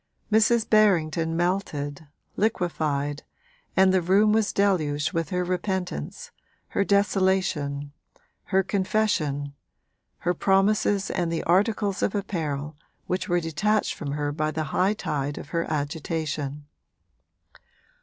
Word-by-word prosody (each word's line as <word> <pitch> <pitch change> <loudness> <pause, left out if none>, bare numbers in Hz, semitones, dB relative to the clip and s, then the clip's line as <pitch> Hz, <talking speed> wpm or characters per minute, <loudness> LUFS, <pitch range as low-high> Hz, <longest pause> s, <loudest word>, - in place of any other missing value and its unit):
Mrs. 225 +1 +4
Berrington 165 -6 +3
melted, 160 -5 -2 0.3
liquefied, 155 -8 -1 0.6
and 190 0 +5
the 185 - +3
room 200 +5 +4
was 220 -1 +2
deluged 155 -6 +1
with 165 -1 -1
her 180 -1 0
repentance, 180 - -3 0.4
her - - +1
desolation, 190 -8 +1 0.5
her 190 -1 +2
confession, 185 -8 0 0.6
her 175 - 0
promises 195 +2 +2
and 170 -2 -1
the 165 - -2
articles 200 +2 +1
of 205 - 0
apparel 155 -7 -3 0.3
which 185 +2 -2
were 175 0 +3
detached 175 +7 0
from 140 -3 -5
her 145 0 -1
by 155 +1 -1
the 155 0 -2
high 195 +3 +2
tide 145 -6 -3
of - - -8
her 165 -1 -2
agitation. 150 -1 -3
175 Hz, 115 wpm, -25 LUFS, 150-195 Hz, 0.6 s, and